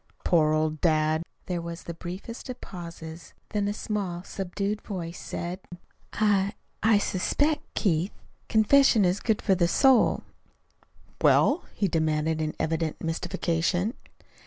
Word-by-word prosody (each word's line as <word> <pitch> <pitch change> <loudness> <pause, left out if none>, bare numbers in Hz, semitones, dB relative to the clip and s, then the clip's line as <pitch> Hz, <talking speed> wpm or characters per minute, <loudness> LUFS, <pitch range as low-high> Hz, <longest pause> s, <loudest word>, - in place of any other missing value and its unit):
Poor 155 -3 +4
old 155 0 0
dad!" 155 -1 +2 0.2
There 175 -2 -2
was 170 +1 -7
the 170 - -6
briefest 185 +10 -7
of 255 - -5
pauses, 170 -2 -9
then 205 -2 0
a 205 - 0
small, 195 -6 -3
subdued 195 +2 -3
voice 175 -4 -6
said: 175 +2 -5 0.5
"I 205 -1 +2 0.3
I 220 -1 +5
suspect, 290 +11 0
Keith, 175 -1 +1 0.4
confession 220 -1 +5
is 180 +2 +1
good 220 -3 0
for 195 - +4
the 175 -2 +3
soul." 260 +6 +4 1.0
"Well?" - - +4
he 200 - +1
demanded 160 -1 0
in 155 0 -2
evident 160 0 -1
mystification. 170 +4 -1
180 Hz, 130 wpm, -27 LUFS, 165-205 Hz, 1.0 s, I